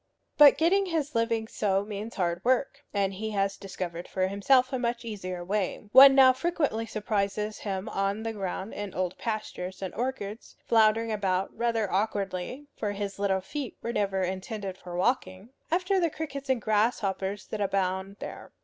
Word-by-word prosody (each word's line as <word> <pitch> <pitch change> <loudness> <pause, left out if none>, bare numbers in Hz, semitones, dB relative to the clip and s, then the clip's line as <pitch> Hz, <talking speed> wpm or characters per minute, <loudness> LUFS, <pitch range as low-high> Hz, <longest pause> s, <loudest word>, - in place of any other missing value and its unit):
But 295 -2 +8
getting 380 +4 +3
his 310 -4 -1
living 230 -1 0
so 200 -2 0
means 210 +2 -6
hard 175 -1 -1
work, 260 +2 +1
and 195 -1 0
he 220 +3 -4
has 195 0 +1
discovered 180 -3 -6
for 185 -1 0
himself 255 +7 +3
a 260 - 0
much 235 -1 -2
easier 185 -5 -5
way. 205 +1 -2
One 270 +2 +10
now 260 -1 +8
frequently 265 -6 -1
surprises 210 0 -2
him 195 -2 -4
on 195 +2 -1
the 225 0 -3
ground 195 0 -4
in 205 -2 -6
old 185 -1 -1
pastures 210 -5 -4
and 190 -2 -5
orchards, 230 -4 -4
floundering 225 0 +3
about 195 -3 -1
rather 230 -4 0
awkwardly 200 +5 -2
(for 205 -1 -2
his 200 -1 -5
little 195 -1 +1
feet 275 +6 -6
were 235 - -2
never 195 -3 0
intended 190 +1 -4
for 180 -2 -9
walking) 185 0 -1 0.2
after 370 +3 +2
the 340 -2 +2
crickets 280 -3 -6
and 255 -4 +1
grasshoppers 205 -2 0
that 215 - -4
abound 195 0 -1
there. - - -8
210 Hz, 165 wpm, -28 LUFS, 190-240 Hz, 0.2 s, One